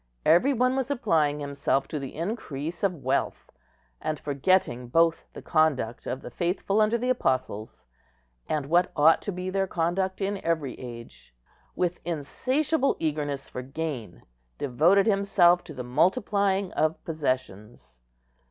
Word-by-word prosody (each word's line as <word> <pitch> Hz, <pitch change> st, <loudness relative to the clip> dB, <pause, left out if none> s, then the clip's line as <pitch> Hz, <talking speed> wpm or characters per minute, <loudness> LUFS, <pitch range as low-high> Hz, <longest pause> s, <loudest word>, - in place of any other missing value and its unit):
Every 175 Hz, -, +5 dB
one 255 Hz, 0 st, +2 dB
was 265 Hz, 0 st, -1 dB
applying 160 Hz, -, +1 dB
himself 140 Hz, -1 st, -1 dB
to 150 Hz, -, -3 dB
the 135 Hz, -1 st, -7 dB
increase 165 Hz, -, -4 dB
of 180 Hz, -8 st, -1 dB
wealth; 130 Hz, +2 st, -1 dB, 0.5 s
and, 155 Hz, -2 st, -2 dB
forgetting 140 Hz, -3 st, +1 dB
both 165 Hz, +5 st, +2 dB
the -, -, -10 dB
conduct 145 Hz, -8 st, +1 dB
of 130 Hz, +2 st, -4 dB
the -, -, -8 dB
faithful 195 Hz, +4 st, 0 dB
under 215 Hz, +2 st, +3 dB
the 250 Hz, +2 st, 0 dB
Apostles, 130 Hz, -, -2 dB, 0.6 s
and 150 Hz, -3 st, -1 dB
what 170 Hz, +5 st, +2 dB
ought 160 Hz, +3 st, +5 dB
to 205 Hz, -, -4 dB
be 185 Hz, 0 st, -4 dB
their 195 Hz, 0 st, 0 dB
conduct 185 Hz, +3 st, -1 dB
in 200 Hz, 0 st, -2 dB
every 160 Hz, -6 st, -1 dB
age, 120 Hz, -, -10 dB, 0.4 s
with 180 Hz, -1 st, -1 dB
insatiable 260 Hz, -, 0 dB
eagerness 145 Hz, -3 st, -2 dB
for 125 Hz, -, -6 dB
gain 135 Hz, -, -5 dB, 0.3 s
devoted 160 Hz, +9 st, +3 dB
himself 195 Hz, -4 st, +4 dB
to 155 Hz, -, -9 dB
the 125 Hz, -, -5 dB
multiplying 195 Hz, -, +1 dB
of 155 Hz, +1 st, 0 dB
possessions. 105 Hz, -, -4 dB
165 Hz, 140 wpm, -27 LUFS, 135-195 Hz, 0.6 s, Every